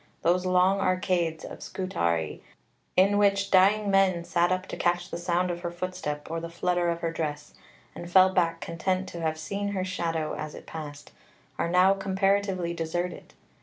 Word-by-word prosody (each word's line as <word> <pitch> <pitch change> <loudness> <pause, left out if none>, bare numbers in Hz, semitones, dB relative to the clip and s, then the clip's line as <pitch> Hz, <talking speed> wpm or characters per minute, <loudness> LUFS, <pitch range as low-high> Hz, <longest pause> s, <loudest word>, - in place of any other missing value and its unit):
Those 180 +2 +2
long 185 +2 +3
arcades 180 -4 0
of - - -9
Scutari 85 - -2 0.6
in 200 +2 +5
which 200 -1 +2
dying 200 +2 +4
men 190 -3 +3
sat 175 +1 +1
up 185 0 0
to - - -4
catch 175 0 0
the - - -3
sound 175 +1 0
of 175 - -4
her 175 0 -3
footstep 175 -4 -4
or 165 - -2
the 170 0 -6
flutter 175 +1 0
of 170 0 -2
her 165 - -1
dress, 150 -2 -4 0.4
and 175 - -8
fell 185 +1 +6
back 165 -2 +1
content 185 +3 -2
to 170 - -7
have 160 -1 -1
seen 200 +6 -3
her 185 -2 -1
shadow 165 -4 -2
as 155 0 -6
it - - -11
passed, 145 -2 -8 0.5
are 170 - 0
now 180 +2 +5
comparatively 195 -2 0
deserted. 175 +2 -4
175 Hz, 175 wpm, -27 LUFS, 165-190 Hz, 0.6 s, fell